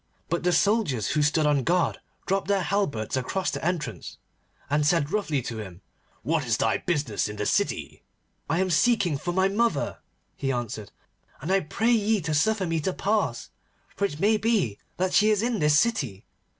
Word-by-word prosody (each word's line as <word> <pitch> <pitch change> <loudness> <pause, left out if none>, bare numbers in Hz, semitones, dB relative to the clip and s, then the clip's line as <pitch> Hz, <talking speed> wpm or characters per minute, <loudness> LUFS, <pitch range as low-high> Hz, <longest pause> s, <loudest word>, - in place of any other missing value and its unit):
But 170 +1 0
the 180 - +2
soldiers 185 - +1
who 150 - +1
stood 150 +1 +2
on 145 -2 +3
guard 175 +5 +1 0.3
dropped 195 0 0
their 200 -2 +1
halberts 150 - -1
across 185 +9 -1
the - - -5
entrance, 175 -2 -3 0.5
and 145 +1 +1
said 155 -1 +2
roughly 155 - 0
to 115 -1 -5
him, 95 -3 -9 0.4
'What 160 -1 0
is 115 -3 0
thy 110 - +1
business 145 - -1
in 105 - -6
the 105 - -3
city?' - - -1 0.5
'I 165 +4 +1
am 190 - 0
seeking 185 -2 +3
for 175 +4 -3
my 190 +2 +2
mother,' 230 +4 0 0.4
he 135 -2 -2
answered, 120 -5 -4 0.5
'and 155 +7 -4
I 195 - +4
pray 220 +7 0
ye 220 -2 +2
to 155 -1 -2
suffer 195 +6 +2
me 165 -1 -1
to 180 +5 -1
pass, 200 - -1 0.4
for 200 - 0
it 150 -6 -4
may 215 +4 +3
be 210 - 0 0.2
that 185 +1 0
she 210 +2 +5
is 210 0 +2
in 235 -2 0
this 150 -1 +4
city. 140 - 0
170 Hz, 190 wpm, -26 LUFS, 140-200 Hz, 0.5 s, she